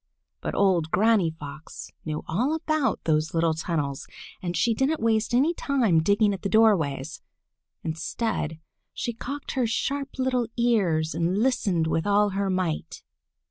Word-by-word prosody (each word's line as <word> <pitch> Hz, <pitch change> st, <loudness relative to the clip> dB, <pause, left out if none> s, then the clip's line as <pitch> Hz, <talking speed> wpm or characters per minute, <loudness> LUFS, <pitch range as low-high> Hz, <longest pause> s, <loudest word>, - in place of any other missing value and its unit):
But -, -, -3 dB
old 180 Hz, -5 st, +2 dB
Granny 205 Hz, -1 st, +3 dB
Fox 150 Hz, -1 st, -9 dB
knew 155 Hz, -1 st, -3 dB
all 250 Hz, -, 0 dB
about 310 Hz, -3 st, 0 dB
those 155 Hz, +1 st, 0 dB
little 165 Hz, -1 st, +2 dB
tunnels, 155 Hz, -4 st, -3 dB, 0.3 s
and 175 Hz, -2 st, -3 dB
she 235 Hz, -, +2 dB
didn't 270 Hz, +7 st, 0 dB
waste 220 Hz, -1 st, +1 dB
any 275 Hz, +8 st, +3 dB
time 240 Hz, -, +2 dB
digging 205 Hz, +4 st, +3 dB
at 190 Hz, -, -6 dB
the 200 Hz, -, -2 dB
doorways. 165 Hz, -10 st, +2 dB, 0.6 s
Instead 160 Hz, 0 st, -3 dB, 0.4 s
she 235 Hz, -, -3 dB
cocked 275 Hz, +5 st, -6 dB
her 255 Hz, -3 st, 0 dB
sharp 275 Hz, +5 st, -2 dB
little 255 Hz, -2 st, 0 dB
ears 190 Hz, -10 st, +2 dB
and 170 Hz, +3 st, 0 dB
listened 205 Hz, -8 st, +1 dB
with 160 Hz, +3 st, 0 dB
all 205 Hz, 0 st, +4 dB
her 195 Hz, 0 st, -1 dB
might. 185 Hz, -4 st, -2 dB
200 Hz, 145 wpm, -26 LUFS, 160-235 Hz, 0.6 s, all